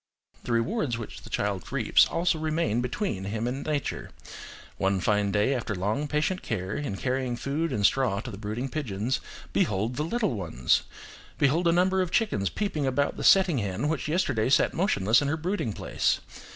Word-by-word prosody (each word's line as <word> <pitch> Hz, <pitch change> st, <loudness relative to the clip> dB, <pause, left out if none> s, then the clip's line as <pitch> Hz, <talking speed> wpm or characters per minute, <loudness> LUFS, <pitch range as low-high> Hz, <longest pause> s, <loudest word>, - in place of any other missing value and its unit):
The -, -, -3 dB
rewards 120 Hz, -, 0 dB
which 115 Hz, -3 st, -8 dB
the -, -, -12 dB
child 100 Hz, -3 st, -2 dB
reaps -, -, +4 dB
also 170 Hz, -1 st, 0 dB
remain 155 Hz, -8 st, 0 dB
between 125 Hz, -, -2 dB
him 110 Hz, +3 st, -2 dB
and 130 Hz, +3 st, -3 dB
nature: 150 Hz, -2 st, -3 dB, 0.7 s
one 95 Hz, 0 st, +1 dB
fine 105 Hz, +1 st, +1 dB
day 105 Hz, +6 st, +2 dB
after 115 Hz, -4 st, -2 dB
long 105 Hz, +11 st, -1 dB
patient 155 Hz, +5 st, 0 dB
care 95 Hz, -2 st, -3 dB
in 140 Hz, -10 st, -3 dB
carrying 130 Hz, +1 st, -1 dB
food 145 Hz, +6 st, -2 dB
and 105 Hz, -6 st, +1 dB
straw 125 Hz, -7 st, +2 dB
to 120 Hz, 0 st, -7 dB
the 100 Hz, -, -8 dB
brooding 110 Hz, +5 st, -3 dB
pigeons, 125 Hz, -4 st, -2 dB, 0.3 s
behold 110 Hz, +5 st, 0 dB
the 150 Hz, -, 0 dB
little 215 Hz, -, 0 dB
ones! 80 Hz, -, +1 dB, 0.6 s
behold 160 Hz, +5 st, +2 dB
a -, -, +5 dB
number 185 Hz, +2 st, +3 dB
of 180 Hz, -, -1 dB
chickens 135 Hz, -, +1 dB
peeping 155 Hz, -, -2 dB
about 140 Hz, +2 st, +1 dB
the -, -, -5 dB
setting 185 Hz, -8 st, +5 dB
hen 100 Hz, +6 st, -2 dB
which 160 Hz, -2 st, -2 dB
yesterday 145 Hz, -, +1 dB
sat -, -, +3 dB
motionless 120 Hz, -, +3 dB
in 145 Hz, -, -1 dB
her 150 Hz, +3 st, 0 dB
brooding 175 Hz, -, -2 dB
place! -, -, 0 dB
130 Hz, 180 wpm, -27 LUFS, 105-160 Hz, 0.7 s, a